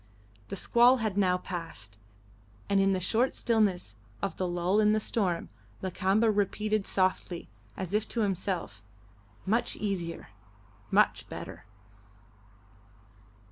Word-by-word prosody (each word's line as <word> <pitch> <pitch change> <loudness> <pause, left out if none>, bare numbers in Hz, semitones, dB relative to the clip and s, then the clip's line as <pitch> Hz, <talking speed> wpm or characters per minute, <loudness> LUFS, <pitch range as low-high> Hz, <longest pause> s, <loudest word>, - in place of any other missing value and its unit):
The - - -5
squall 240 +6 +5
had 220 -5 -2
now 185 -3 +3
passed, 165 - -7 0.7
and, 200 -1 +3
in 195 0 +3
the 185 - 0
short 225 +8 +1
stillness 205 - +1 0.2
of 195 - -3
the 185 - -1
lull 175 +3 +1
in 210 0 +4
the 215 - +2
storm, 190 -6 -1 0.3
Lakamba 195 +4 +2
repeated 210 0 0
softly, 185 - -1 0.3
as 185 0 -5
if 215 +1 +1
to 235 - -2
himself, 185 - -2 0.6
"Much 225 +5 +1
easier. 175 - -3 0.6
Much - - +2
better." - - -8
195 Hz, 120 wpm, -29 LUFS, 180-215 Hz, 0.7 s, squall